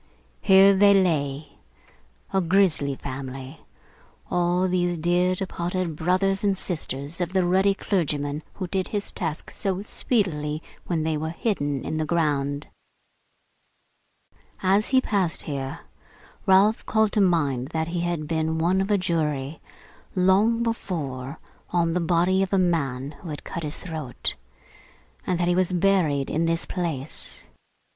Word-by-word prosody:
Here 195 Hz, 0 st, +7 dB
they 200 Hz, +1 st, +6 dB
lay, 150 Hz, -6 st, 0 dB, 0.7 s
a 190 Hz, -, +3 dB
grisly 170 Hz, -6 st, +2 dB
family, 135 Hz, +2 st, -7 dB, 0.7 s
all 175 Hz, +1 st, +2 dB
these 175 Hz, -1 st, 0 dB
dear 175 Hz, +3 st, +2 dB
departed 180 Hz, -2 st, -3 dB
brothers 185 Hz, +5 st, +1 dB
and 200 Hz, -2 st, +2 dB
sisters 155 Hz, -2 st, -4 dB
of 175 Hz, +1 st, -2 dB
the 185 Hz, -2 st, +3 dB
ruddy 190 Hz, +2 st, +3 dB
clergyman 150 Hz, -7 st, -1 dB
who 190 Hz, -, -4 dB
did 190 Hz, +1 st, -1 dB
his 205 Hz, -1 st, -3 dB
task 160 Hz, -3 st, -4 dB
so 195 Hz, -1 st, -2 dB
speedily 160 Hz, -, -1 dB, 0.2 s
when 165 Hz, -3 st, 0 dB
they 160 Hz, -1 st, 0 dB
were 160 Hz, +1 st, -3 dB
hidden 145 Hz, -, -2 dB
in 155 Hz, -, -2 dB
the 155 Hz, -, 0 dB
ground! 145 Hz, -3 st, 0 dB, 2.0 s
As 195 Hz, +3 st, +3 dB
he 260 Hz, -1 st, +4 dB
passed 195 Hz, -8 st, 0 dB
here, 140 Hz, 0 st, -4 dB, 0.7 s
Ralph 195 Hz, +3 st, +5 dB
called 220 Hz, -1 st, +2 dB
to 210 Hz, -, +2 dB
mind 145 Hz, -9 st, +2 dB
that 160 Hz, +1 st, -2 dB
he 175 Hz, 0 st, -2 dB
had 170 Hz, -3 st, -2 dB
been 160 Hz, 0 st, 0 dB
one 175 Hz, +4 st, +2 dB
of 195 Hz, -, -2 dB
a 205 Hz, -, +4 dB
jury, 155 Hz, -5 st, -1 dB, 0.5 s
long 200 Hz, +5 st, +3 dB
before, 150 Hz, -, -3 dB, 0.3 s
on 170 Hz, -2 st, +1 dB
the 180 Hz, -, +1 dB
body 175 Hz, +3 st, +2 dB
of 195 Hz, -, -1 dB
a 195 Hz, -, +3 dB
man 145 Hz, -7 st, 0 dB
who 170 Hz, -, -8 dB
had 150 Hz, -, -6 dB
cut 170 Hz, -, -5 dB
his 150 Hz, -2 st, -4 dB
throat; 155 Hz, -8 st, -4 dB, 0.9 s
and 180 Hz, -2 st, 0 dB
that 175 Hz, -, +1 dB
he 175 Hz, -, +3 dB
was 185 Hz, 0 st, +2 dB
buried 175 Hz, -7 st, +2 dB
in 160 Hz, +2 st, +1 dB
this 165 Hz, 0 st, 0 dB
place. 160 Hz, -6 st, -3 dB
170 Hz, 145 wpm, -25 LUFS, 150-190 Hz, 2.0 s, Here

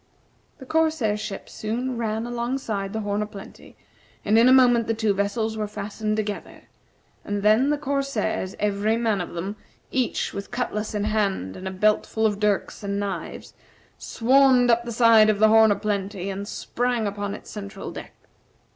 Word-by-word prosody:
The 265 Hz, -, -11 dB
corsair 310 Hz, -8 st, +1 dB
ship 210 Hz, -2 st, -6 dB
soon 245 Hz, +4 st, -3 dB
ran 225 Hz, -1 st, -2 dB
alongside 235 Hz, -4 st, -3 dB
the 220 Hz, -, -3 dB
"Horn 205 Hz, 0 st, -1 dB
o' 210 Hz, -, -2 dB
Plenty," 200 Hz, -2 st, -12 dB, 0.5 s
and 215 Hz, -, +3 dB
in 230 Hz, +2 st, +6 dB
a -, -, +6 dB
moment 245 Hz, -3 st, +5 dB
the 225 Hz, -, 0 dB
two 220 Hz, -2 st, +1 dB
vessels 220 Hz, +3 st, -1 dB
were 210 Hz, -1 st, -2 dB
fastened 210 Hz, +1 st, -3 dB
together; 210 Hz, -1 st, -5 dB, 0.6 s
and 205 Hz, -1 st, -3 dB
then 220 Hz, +6 st, +4 dB
the 295 Hz, -, +1 dB
corsairs, 275 Hz, -9 st, -2 dB
every 210 Hz, +2 st, 0 dB
man 220 Hz, -5 st, 0 dB
of 175 Hz, -, -7 dB
them, 195 Hz, +5 st, -4 dB, 0.3 s
each 255 Hz, -3 st, -1 dB
with 200 Hz, -, -6 dB
cutlass 215 Hz, -4 st, -3 dB
in 205 Hz, -, -1 dB
hand 200 Hz, -, -1 dB
and 190 Hz, -, -7 dB
a -, -, -1 dB
belt 210 Hz, +3 st, +2 dB
full 220 Hz, 0 st, -1 dB
of 205 Hz, -2 st, +1 dB
dirks 210 Hz, 0 st, 0 dB
and 200 Hz, -1 st, -2 dB
knives, 200 Hz, -2 st, -5 dB, 0.5 s
swarmed 255 Hz, 0 st, +4 dB
up 235 Hz, +1 st, +2 dB
the 240 Hz, -, -4 dB
side 225 Hz, -2 st, +6 dB
of 215 Hz, -, +2 dB
the 215 Hz, +1 st, +5 dB
"Horn 220 Hz, 0 st, +6 dB
o' -, -, +3 dB
Plenty," 200 Hz, -2 st, -3 dB
and 200 Hz, +1 st, -5 dB
sprang 245 Hz, 0 st, -2 dB
upon 205 Hz, 0 st, -3 dB
its -, -, -12 dB
central 200 Hz, -1 st, -7 dB
deck. -, -, -9 dB
215 Hz, 180 wpm, -24 LUFS, 205-235 Hz, 0.6 s, in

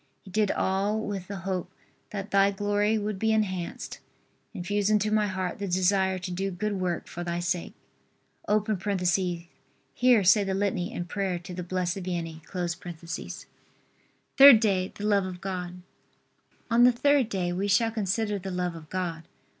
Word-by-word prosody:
He 190 Hz, -, -13 dB
did 210 Hz, 0 st, +2 dB
all 195 Hz, +4 st, 0 dB
with 200 Hz, -4 st, -4 dB
the 200 Hz, -, -5 dB
hope 185 Hz, -2 st, -2 dB, 0.4 s
that 200 Hz, -1 st, -6 dB
Thy 195 Hz, 0 st, +5 dB
glory 205 Hz, +2 st, +1 dB
would 210 Hz, -2 st, -3 dB
be 220 Hz, +1 st, +2 dB
enhanced. 190 Hz, -5 st, -2 dB, 0.5 s
Infuse 205 Hz, +1 st, -1 dB
into 215 Hz, 0 st, +2 dB
my 215 Hz, -1 st, +2 dB
heart 185 Hz, -1 st, -3 dB
the 200 Hz, -, -3 dB
desire 190 Hz, +1 st, +2 dB
to 180 Hz, 0 st, -5 dB
do 190 Hz, +2 st, -2 dB
good 205 Hz, +3 st, -2 dB
work 180 Hz, -3 st, -2 dB
for 175 Hz, -, -6 dB
Thy 170 Hz, 0 st, -2 dB
sake. 175 Hz, 0 st, -2 dB, 0.7 s
[Here 200 Hz, +2 st, 0 dB
say 190 Hz, +3 st, +5 dB
the 195 Hz, -1 st, -1 dB
litany 195 Hz, -1 st, -1 dB
and 175 Hz, -7 st, -5 dB
prayer 195 Hz, -1 st, -2 dB
to 180 Hz, +2 st, -9 dB
the 180 Hz, -, -4 dB
Blessed 180 Hz, +1 st, -2 dB
Vianney.] 170 Hz, -3 st, -4 dB, 2.0 s
THIRD 275 Hz, -4 st, +10 dB
DAY. 190 Hz, -4 st, +1 dB
THE 205 Hz, -, -5 dB
LOVE 200 Hz, -2 st, +3 dB
OF 180 Hz, -1 st, -7 dB
GOD. 180 Hz, -1 st, -5 dB, 0.9 s
On 235 Hz, +1 st, +5 dB
the 250 Hz, -, +8 dB
third 275 Hz, 0 st, +2 dB
day 180 Hz, -4 st, -1 dB
we 195 Hz, +3 st, -1 dB
shall 225 Hz, +3 st, +3 dB
consider 210 Hz, 0 st, -1 dB
the 190 Hz, +1 st, -6 dB
love 180 Hz, -1 st, -2 dB
of 160 Hz, -2 st, -11 dB
God. 175 Hz, -3 st, -3 dB
195 Hz, 160 wpm, -27 LUFS, 180-210 Hz, 2.0 s, THIRD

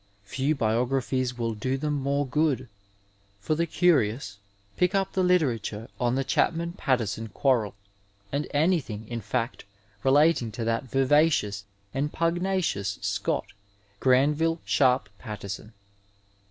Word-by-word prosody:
Few 135 Hz, +9 st, -1 dB
biographies 125 Hz, +1 st, 0 dB
will 115 Hz, -1 st, -1 dB
do 130 Hz, +5 st, -2 dB
them 150 Hz, +2 st, -1 dB
more 140 Hz, 0 st, 0 dB
good. 135 Hz, -2 st, 0 dB, 0.7 s
For 105 Hz, +10 st, -1 dB
the 170 Hz, +2 st, 0 dB
curious 125 Hz, -, +1 dB, 0.4 s
pick 180 Hz, +3 st, +2 dB
up 195 Hz, -1 st, 0 dB
the 190 Hz, -, +1 dB
literature 125 Hz, -, +1 dB
on 120 Hz, 0 st, +1 dB
the 135 Hz, -, +1 dB
Chapman 170 Hz, +5 st, 0 dB
Pattison 115 Hz, -, -1 dB
quarrel, 115 Hz, -4 st, +1 dB, 0.6 s
and 145 Hz, +2 st, -1 dB
anything, 145 Hz, -, 0 dB
in 120 Hz, 0 st, -4 dB
fact, 115 Hz, +4 st, -2 dB, 0.4 s
relating 140 Hz, -3 st, +4 dB
to 115 Hz, -, -4 dB
that 115 Hz, +2 st, 0 dB
vivacious 135 Hz, -6 st, +2 dB, 0.3 s
and 145 Hz, +2 st, -1 dB
pugnacious 170 Hz, -, 0 dB
Scot, -, -, -1 dB, 0.5 s
Qranville 150 Hz, +6 st, +3 dB
Sharpe 130 Hz, -4 st, +3 dB
Pattison. 105 Hz, -1 st, -7 dB
130 Hz, 120 wpm, -27 LUFS, 115-155 Hz, 0.7 s, relating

